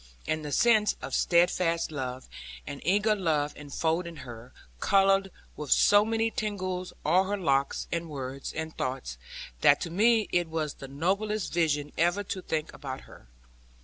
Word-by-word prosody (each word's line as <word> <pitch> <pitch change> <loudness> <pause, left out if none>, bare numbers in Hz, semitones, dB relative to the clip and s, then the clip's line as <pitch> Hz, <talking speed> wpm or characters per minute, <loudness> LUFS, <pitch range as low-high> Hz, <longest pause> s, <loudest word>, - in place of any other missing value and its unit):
And 155 0 -1
the 150 - -5
sense 215 +3 +4
of - - -7
steadfast 170 -1 +2
love, 130 -3 -5 0.4
and 140 0 -7
eager 210 +4 +3
love 155 -6 0
enfolding 165 +4 -2
her, 120 +1 -10 0.3
coloured 195 - +3 0.3
with 150 -2 -6
so 205 0 +6
many 225 +1 0
tinges 185 -4 -3
all 180 +5 +4
her 205 +2 -1
looks, 140 -7 0
and 170 -1 -2
words, 135 -1 -5
and 160 0 -5
thoughts, 60 - -4 0.4
that - - +5
to 170 - -4
me 220 +4 +3
it 175 -1 +1
was 160 -2 -2
the 135 - -10
noblest 195 +9 -1
vision 150 -4 +1
even 175 +5 +2
to 185 - -4
think 160 -3 -3
about 130 -2 -6
her. - - -16
170 Hz, 155 wpm, -28 LUFS, 145-195 Hz, 0.4 s, so